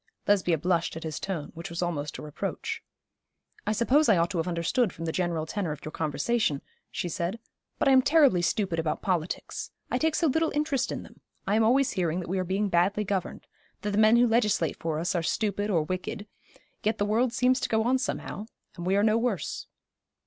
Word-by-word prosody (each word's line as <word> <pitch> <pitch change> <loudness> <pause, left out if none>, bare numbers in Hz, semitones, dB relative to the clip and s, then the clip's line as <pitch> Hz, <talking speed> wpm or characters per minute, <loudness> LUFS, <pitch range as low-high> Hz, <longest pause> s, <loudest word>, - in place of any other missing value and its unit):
Lesbia 185 -5 +3
blushed 170 +1 0
at 160 - -7
his 155 -3 -4
tone, 175 -7 -4
which 170 +3 -7
was 170 +1 -3
almost 150 -4 -3
a - - -8
reproach. 150 -1 -4 0.9
'I - - +2
suppose 250 +6 +3
I 210 - +6
ought 170 +3 +1
to 180 - -1
have 165 - -1
understood 180 +6 +1
from 165 - -7
the 160 - -1
general 170 -3 -1
tenor 180 -1 -2
of 150 - -11
your 155 - -5
conversation,' 155 - 0 0.3
she - - -3
said; 175 +4 -2 0.4
'but - - +1
I - - +6
am 260 -1 +7
terribly 280 - +5
stupid 175 -1 0
about 160 -1 -2
politics. 180 -3 -2 0.2
I - - +1
take 320 0 +1
so 335 - +2
little 320 +2 +2
interest 295 -3 0
in - - -4
them. - - -16 0.3
I 200 +1 +1
am 220 - +4
always 260 +4 +3
hearing 175 -3 0
that 180 - -6
we 190 +1 0
are - - +1
being 195 +3 0
badly 195 +4 +2
governed 195 -3 -3 0.4
that 210 - -1
the 205 - +1
men 220 +1 +6
who 240 +1 +6
legislate 215 - +1
for 160 -2 -2
us 170 +3 -1
are 175 - +1
stupid 205 +3 -1
or 170 -6 +2
wicked; 185 +4 -4 0.6
yet 215 +1 0
the 205 - +1
world 230 +4 +2
seems 250 +2 +2
to - - -2
go 220 0 +2
on 255 +3 +2
somehow, 215 -4 -4 0.3
and 175 -2 -5
we 190 - +3
are 200 - +3
no 220 +1 +4
worse.' 230 -6 -2
195 Hz, 220 wpm, -28 LUFS, 170-225 Hz, 0.9 s, am